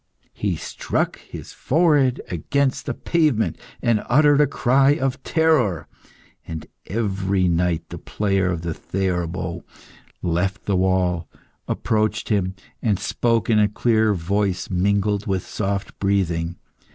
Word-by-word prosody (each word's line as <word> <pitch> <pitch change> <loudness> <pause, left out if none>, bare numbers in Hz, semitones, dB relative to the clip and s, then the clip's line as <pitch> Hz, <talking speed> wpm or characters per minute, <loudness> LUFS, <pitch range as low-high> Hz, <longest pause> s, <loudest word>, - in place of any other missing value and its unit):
He 100 -4 -1
struck - - -2
his - - -10
forehead 145 -4 +2
against 135 - 0
the - - -2
pavement, 155 -10 +1 0.2
and 115 -3 +2
uttered 145 +2 +5
a 145 - +4
cry 135 +2 +3
of 135 -1 -2
terror. 125 - +2 0.6
And 80 -1 -6 0.2
every 95 -3 0
night 85 -1 0
the - - -7
player 95 -3 0
of 85 -2 -3
the 85 -1 -2
theorbo 90 -1 -3 0.6
left 95 +5 -1
the 100 - +1
wall, 90 -2 +1 0.4
approached 110 -1 0
him, 95 -3 0 0.3
and 105 -4 +1
spoke 115 +1 0
in 110 -2 +4
a 105 -1 +4
clear 110 -1 +2
voice 95 +2 -1
mingled 100 +2 +1
with 95 -2 -1
soft 100 -1 -3
breathing. 85 -4 0
100 Hz, 125 wpm, -22 LUFS, 90-115 Hz, 0.6 s, uttered